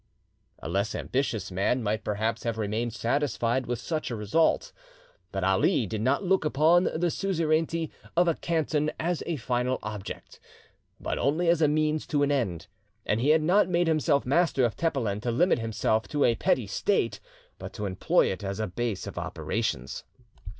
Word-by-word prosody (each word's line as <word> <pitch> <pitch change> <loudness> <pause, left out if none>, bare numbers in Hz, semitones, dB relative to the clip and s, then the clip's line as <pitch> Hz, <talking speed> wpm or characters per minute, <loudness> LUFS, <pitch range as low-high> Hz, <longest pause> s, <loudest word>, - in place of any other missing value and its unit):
A - - -8
less 100 +5 -1
ambitious 115 -8 -2
man 100 +7 0
might 110 +1 -1
perhaps 110 +2 -1
have 115 -2 -2
remained 110 +2 -1
satisfied 120 0 0
with 120 0 -1
such 155 -2 -3
a 120 - -3
result. 110 +10 +1 0.6
But 95 -1 -3
Ali 95 +5 +2
did 105 +1 -4
not 130 - +1
look 190 -1 +2
upon 160 +4 +4
the 170 +1 0
suzerainty 165 -3 0 0.3
of 175 0 +5
a 170 - +4
canton 155 -2 0
as 170 +1 -1
a 170 - -1
final 125 -1 -1
object, 105 -2 -7 0.6
but - - -3
only 165 +5 +1
as 170 -1 +3
a 155 - +5
means 155 +1 0
to 145 -1 +1
an 145 - +2
end; 110 - -1 0.4
and 105 +2 0
he 140 - +2
had 155 0 +4
not 185 +3 +3
made 175 0 +2
himself 155 -3 +2
master 140 -1 +2
of 115 - -1
Tepelen 125 -11 -1
to 120 - -2
limit 130 +6 +3
himself 110 0 0
to 145 -1 0
a 120 - +4
petty 115 - +1
state, - - 0 0.4
but - - -7
to 105 - -4
employ 95 -2 +2
it 95 +2 -6
as 100 +1 -4
a 110 - 0
base 110 +1 -3
of - - -6
operations. 65 +2 -3
130 Hz, 180 wpm, -27 LUFS, 110-160 Hz, 0.6 s, of